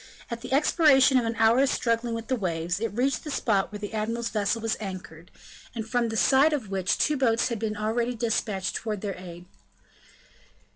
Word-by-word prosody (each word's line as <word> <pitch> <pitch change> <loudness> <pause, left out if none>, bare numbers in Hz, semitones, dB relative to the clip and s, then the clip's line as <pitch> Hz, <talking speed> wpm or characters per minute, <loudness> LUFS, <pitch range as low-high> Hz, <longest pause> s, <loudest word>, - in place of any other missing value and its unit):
At 235 0 -4
the 250 - -8
expiration 275 -2 +5
of 240 - -2
an 230 0 -2
hour's 235 +5 +4
struggling 230 0 0
with 230 0 -5
the 260 - +1
waves, 180 -3 -2
it 230 - 0
reached 250 +5 0
the 305 - -6
spot 215 -9 0
where 210 - -6
the 205 +1 -7
admiral's 230 +2 -2
vessel 210 +1 0
was 225 0 -1
anchored, 185 -4 -8 0.5
and 220 -1 -4
from 240 0 0
the 225 - -3
side 270 - +4
of 235 -9 -3
which 190 -1 0
two 300 - +1
boats 235 -2 +2
had 230 -2 -4
already 230 +3 -1
been - - -11
dispatched 210 -4 -1
towards 215 -3 -4
their 200 -2 -2
aid. 175 -1 -10
225 Hz, 195 wpm, -26 LUFS, 205-245 Hz, 0.5 s, expiration